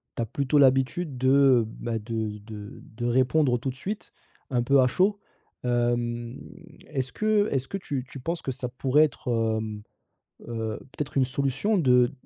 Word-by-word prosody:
tu - - -2
as - - 0
plutôt 140 +5 +1
l'habitude 135 +2 +3
de, 130 +1 +2
heu, 135 -3 +5
bah, 115 +1 -4
de 110 -1 -3
de 105 -1 -10
de 120 +2 -7
répondre 130 +2 +3
tout 130 +3 -2
de - - -13
suite, 200 +10 -6 0.4
un 125 -2 +2
peu 140 +2 +4
à - - +5
chaud. 195 +9 +2 0.4
Hem, 120 0 -1 0.5
est-ce 135 -3 -3
que 215 -1 +2
est-ce 135 -1 -1
que 195 - -3
tu 140 -7 -4
tu 135 - -9
penses 165 +6 -3
que 135 - -2
ça 125 0 -4
pourrait 135 +4 +3
être 150 - -8
peut-être, 115 -2 +1
hem, 110 -1 -5 0.7
heu, 110 -2 -3 0.2
peut-être 145 -1 -4
une 130 - +4
solution 140 - 0
de 125 -5 +4
130 Hz, 180 wpm, -26 LUFS, 120-140 Hz, 0.7 s, heu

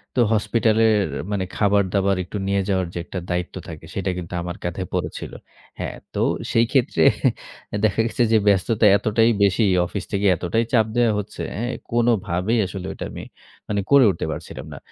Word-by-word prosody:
তো - - +1
হসপিটালের 110 0 +3 0.3
মানে 100 -2 -1
খাবার-দাবার 100 -1 +2
একটু 90 - -6
নিয়ে 100 0 +1
যাওয়ার 95 -2 +1
যে - - -6
একটা 95 - -5
দায়িত্ব 90 0 -2
থাকে, 80 -1 -9
সেটা 95 -1 -2
কিন্তু 90 -1 -7
আমার 90 0 -5
কাঁধে 90 +2 -3
পড়েছিল। - - -3 0.5
হ্যাঁ, - - -4 0.2
তো - - -1 0.3
সেই 115 0 +4
ক্ষেত্রে 125 - +2 0.8
দেখা 110 - 0
গেছে 120 - 0
যে 110 - +6
ব্যস্ততা 105 +3 +3
এতটাই 110 +3 +2
বেশি, 100 +3 +3 0.2
অফিস 95 +3 -5
থেকে 100 -1 0
এতটাই 90 +7 0
চাপ 110 -3 +5
দেয়া 120 -2 +3
হচ্ছে, 105 - -7 0.2
হ্যাঁ? 120 +3 -2 0.2
কোনোভাবেই 115 -3 +1
আসলে 95 0 -6
ঐটা - - -6
আমি - - -7 0.5
মানে 105 -1 0
করে 140 -1 +8
উঠতে 85 - -4
পারছিলাম - - -7
না। - - -8
100 Hz, 170 wpm, -22 LUFS, 90-115 Hz, 0.8 s, করে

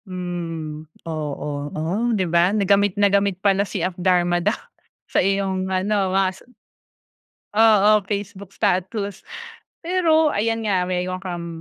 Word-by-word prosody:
Hmm, 165 -4 -5 0.2
oo. 150 -2 -4
Oh, 185 +10 -1
'di 190 - 0
ba 170 +1 +3
na 200 - +1
gamit 200 0 +3
na 205 - +4
gamit 200 -2 +2
pala 195 0 +2
si 180 -4 -2
Up 185 - -2
Dharma 175 -1 +2
Down 210 +5 +1 0.5
sa - - +1
iyong 190 -1 0
ano 190 +1 0
mas 190 -1 0 1.1
oo, 215 -1 +5 0.2
Facebook 200 -1 -5
status. 200 +1 -1 0.6
Pero 330 -3 +3
ayan 225 +2 0
nga 185 -3 +1
meron 185 0 -2
kang 175 -2 -5
190 Hz, 135 wpm, -22 LUFS, 175-205 Hz, 1.1 s, oo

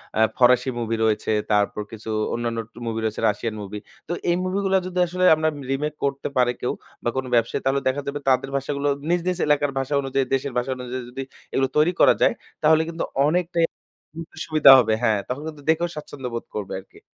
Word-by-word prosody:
অ্যা 110 - +2 0.2
ফরাসি 125 +1 +4
মুভি 115 0 -1
রয়েছে, 110 0 +1 0.2
তারপর 105 0 +1
কিছু 110 0 -8 0.2
অন্যান্য 115 -1 -2 0.2
টু - - -21
মুভি 115 0 -2
রয়েছে, 110 -1 -2
রাশিয়ান 110 +2 -3
মুভি। 105 +1 -6 0.3
তো - - -5 0.2
এই 175 - +3
মুভিগুলা, 190 +1 +1
যদি 180 0 -3
আসলে 180 +1 -2
আমরা 155 0 0 0.2
রিমেক 150 +2 -1
করতে 140 0 -1
পারে 125 -1 +4
কেউ 125 - 0 0.3
বা, 120 - +1
কোনো 130 0 -2
ব্যবসায়ী, 115 0 +1
তাহলে 135 +1 +2
দেখা 130 +2 0
যাবে 145 +1 -3
তাদের 130 +1 +2
ভাষাগুলো 140 +1 -1 0.2
নিজ, 175 0 +3
নিজ 185 -1 0
এলাকার 145 -1 +2
ভাষা 135 +2 -3
অনুযায়ী, 135 0 0
দেশের 135 0 -1
ভাষা 125 +2 -1
অনুযায়ী 125 0 -5
যদি 135 +2 -5 0.3
এগুলো 135 0 +2
তৈরি 155 +4 +4
করা - - +7
যায়, - - +5 0.3
তাহলে 160 +1 +5
কিন্তু 165 0 -3 0.2
অনেকটাই 170 +1 +1 0.5
উ - - -5 0.3
সুবিধা 155 -3 +7
হবে, 110 -2 +2
হ্যাঁ? 110 -3 +3
তাহলে 130 +4 -4
কিন্তু 150 -2 -12
দেখেও 170 +2 +2
স্বাচ্ছন্দ্য 145 -3 -7
বোধ 115 - -4
করবে 100 -2 -4
আরকি। 95 - -18
135 Hz, 200 wpm, -23 LUFS, 120-155 Hz, 0.5 s, করা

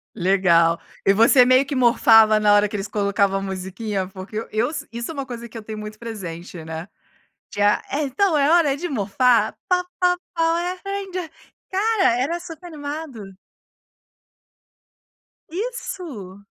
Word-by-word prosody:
Legal, 170 -3 +3 0.3
e 195 - +5
você 230 +4 +6
meio 255 +2 +4
que 280 +1 -4
"morfava" 225 -3 +5
na 210 -1 +4
hora 205 0 +4
que 210 - -7
eles 200 0 -3
colocavam 200 -1 +1
a - - -6
musiquinha, 190 +1 -4
porque 195 +4 -7
eus 240 +8 -1
isso 235 +5 -5
é - - -7
uma 275 -3 -4
coisa 235 -2 -7
que 230 - -11
eu - - -6
tenho 215 0 -7
muito 215 0 -8
presente, 180 -7 -7
né. 160 +2 -7 0.7
De, 205 - -5
ah: 205 0 +3
"Então 305 +5 +1
é 285 0 +3
hora 320 -5 +4
de 350 +5 -4
morfar!". 230 - +2
"Po 360 0 +2 0.2
po 360 0 +3 0.2
power 340 +2 0
rangers." 385 -4 -4 0.4
Cara, 390 - +2
era 325 +7 -1
super 345 0 -10
animado! 285 - -7 2.1
Isso. 330 - -6
235 Hz, 150 wpm, -22 LUFS, 200-320 Hz, 2.1 s, você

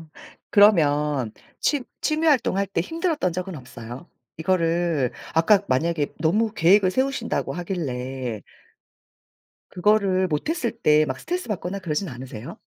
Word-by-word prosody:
어 160 - -14 0.4
그러면 150 - +4 0.3
취 290 -3 +1 0.2
취미활동 305 -9 +2
할 200 - +1
때 190 -3 -2
힘들었던 325 - -1
적은 180 0 -4
없어요? 125 +3 -10 0.3
이거를 165 -5 +1 0.2
아까 180 +5 +5
만약에 150 +3 0
너무 205 +8 +1
계획을 190 0 +4
세우신다고 260 +1 -1
하길래 130 - -4 1.3
그거를 190 -1 +2
못 150 - -2
했을 320 -8 -1
때 155 -9 +3
막 130 -2 -4
스트레스받거나 210 - -3
그러진 180 +1 -2
않으세요? 130 - -8
175 Hz, 300 characters per minute, -24 LUFS, 150-210 Hz, 1.3 s, 아까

